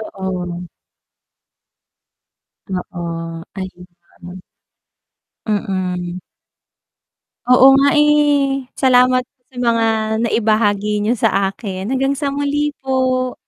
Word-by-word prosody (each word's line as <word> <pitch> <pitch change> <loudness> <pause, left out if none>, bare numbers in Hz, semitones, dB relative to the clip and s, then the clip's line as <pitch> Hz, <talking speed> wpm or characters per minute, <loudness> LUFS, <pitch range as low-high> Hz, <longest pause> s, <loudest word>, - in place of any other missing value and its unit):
Oo. 185 -4 -5 2.3
Oo 165 -1 -5 0.2
ayun. 185 -1 -8 1.6
Mm. 185 -4 -2 1.3
Oo 265 +2 +7
nga, 275 +1 +4
eh, 290 -3 +2
salamat 255 -1 +4 0.2
sa 260 - -20
mga 230 -2 +1 0.4
naibahagi 210 -2 +1
niyo 225 +3 0
sa 195 -1 +1
akin 195 0 -6
hanggang 270 +1 +1
sa 280 0 -2
muli 285 +1 -1
po. 255 -1 0
230 Hz, 80 wpm, -18 LUFS, 190-265 Hz, 2.3 s, Oo